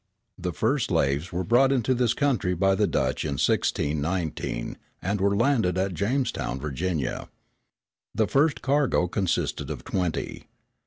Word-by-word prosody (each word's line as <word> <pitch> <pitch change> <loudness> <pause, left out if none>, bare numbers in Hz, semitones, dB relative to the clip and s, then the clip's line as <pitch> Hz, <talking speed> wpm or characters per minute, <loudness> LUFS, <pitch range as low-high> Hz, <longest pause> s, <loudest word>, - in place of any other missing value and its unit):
The 90 -1 -3
first 115 - 0
slaves 75 -2 0
were 90 +2 -2
brought 125 +6 +4
into 130 -1 +2
this 120 -2 +1
country 120 - +1
by 95 +2 +3
the 95 - +2
Dutch - - 0
in 75 - -2
1619, 75 -1 -1 0.2
and 100 +1 -2
were 100 +1 +3
landed 110 -6 +2
at 95 0 0
Jamestown, 100 - -1
Virginia. 75 +2 -3 0.9
The 110 - +3
first 145 +7 +2
cargo 135 -10 +2
consisted 95 -1 -1
of - - -5
twenty. 90 -4 -3
95 Hz, 140 wpm, -26 LUFS, 85-120 Hz, 0.9 s, brought